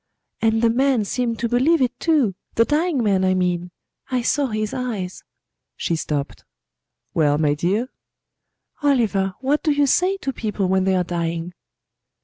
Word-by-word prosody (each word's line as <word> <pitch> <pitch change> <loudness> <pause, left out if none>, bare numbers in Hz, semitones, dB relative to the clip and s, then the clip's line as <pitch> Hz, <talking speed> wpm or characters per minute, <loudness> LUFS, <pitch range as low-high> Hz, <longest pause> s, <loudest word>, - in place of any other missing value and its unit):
"And 225 0 +2
the 230 - +5
man 255 -2 +2
seemed 235 +1 -1
to 235 - -1
believe 260 +8 +3
it, 250 -1 0
too 295 - +2 0.2
the 230 - +4
dying 300 -2 +1
man, 195 -3 +2
I 185 0 +2
mean. 180 -1 0 0.4
I 255 -2 0
saw 285 +3 +1
his 215 -2 -3
eyes." 215 -8 -4 0.5
She 170 - -1
stopped. 145 -3 -3 0.7
"Well, 145 -2 +2
my 150 -1 +2
dear?" 190 +11 0 0.9
"Oliver, 215 -9 +1
what 280 +3 +1
do 310 - +1
you 290 0 +3
say 365 +8 +2
to 270 -8 -4
people 210 -4 -2
when 190 0 +2
they 190 0 +2
are 180 - +2
dying?" 170 0 -3
225 Hz, 160 wpm, -22 LUFS, 185-265 Hz, 0.9 s, the